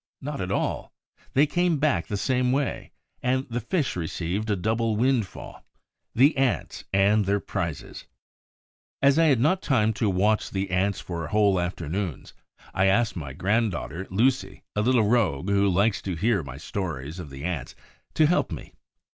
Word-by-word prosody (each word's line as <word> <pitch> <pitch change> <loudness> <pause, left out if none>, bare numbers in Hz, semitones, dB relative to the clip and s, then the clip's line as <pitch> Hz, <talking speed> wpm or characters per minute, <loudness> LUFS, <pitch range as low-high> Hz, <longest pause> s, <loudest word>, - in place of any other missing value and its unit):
Not 145 -2 -5
at 90 0 -3
all: - - -2 0.4
they 140 +3 +5
came 175 +1 +1
back 145 0 +1
the 105 - -2
same 125 +4 +1
way, 140 -1 -2 0.3
and 130 +2 0
the 120 - -1
Fish 135 - -1
received 90 +5 -3
a 105 - +2
double 110 +4 0
windfall, 120 -3 -1 0.5
the 135 +6 +5
Ants 135 -3 -1
and 100 +2 +3
their 100 +1 +1
prizes. 85 -8 -5 1.0
As 140 +3 +5
I 165 - +5
had 140 -6 +4
not 160 +9 +2
time 110 -5 +2
to 110 - +3
watch 105 +3 +1
the 95 -1 -3
Ants 95 +2 +1
for 85 -3 -5
whole 100 0 +3
afternoons, 85 -1 -4 0.4
I 95 - +2
asked 115 +4 +2
my 70 -7 -6
granddaughter 95 - -1
Lucie, 105 -1 0
a 105 - +1
little 120 -2 +3
rogue 100 - +1
who 100 0 +3
likes 100 +2 +2
to 95 -3 -3
hear 105 +3 +1
my 65 -3 -8
stories 80 -2 -5
of 85 - -7
the 70 0 -9
Ants, 80 -7 -4 0.4
to 155 - +5
help 175 +4 +1
me. - - -8
105 Hz, 165 wpm, -25 LUFS, 90-125 Hz, 1.0 s, they